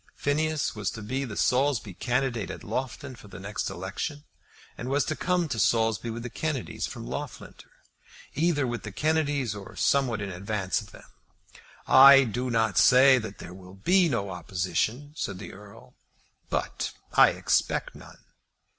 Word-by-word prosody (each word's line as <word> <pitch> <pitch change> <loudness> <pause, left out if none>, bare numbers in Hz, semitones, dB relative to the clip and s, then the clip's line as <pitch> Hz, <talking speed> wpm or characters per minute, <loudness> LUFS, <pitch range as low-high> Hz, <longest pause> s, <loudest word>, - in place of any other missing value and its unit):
Phineas 155 0 -1
was 105 -3 -2
to 110 - -8
be 130 +6 -2
the 110 -5 -7
Saulsby 125 -5 +1
candidate 120 +1 -1
at - - -7
Loughton 130 +3 -4
for 105 - -15
the 95 - -11
next 105 +2 -4
election, 115 - -5 0.5
and 125 - -6
was 140 +1 +1
to 155 - -2
come 180 0 0
to 115 - -2
Saulsby 115 +1 +1
with 115 +1 -5
the 125 - -5
Kennedys 155 -6 -3
from - - -8
Loughlinter, - - -7 0.6
either 155 -3 +1
with 120 -1 -3
the 110 - -7
Kennedys 145 -3 0
or 100 -2 -10
somewhat 130 -6 +1
in 100 -2 -4
advance 100 +3 -2
of 105 - -13
them. - - -15 0.8
"I 135 +1 +9
do 125 +2 -3
not 115 -5 +2
say 130 +1 +7
that 110 -3 -7
there 90 - -9
will 90 0 -13
be 180 - +3
no 100 -7 -2
opposition," 100 - -2
said 95 - -4
the 105 - -9
Earl, 100 0 -14 0.6
"but - - -2 0.2
I - - +7
expect - - 0
none." - - -15
120 Hz, 165 wpm, -27 LUFS, 105-140 Hz, 0.8 s, I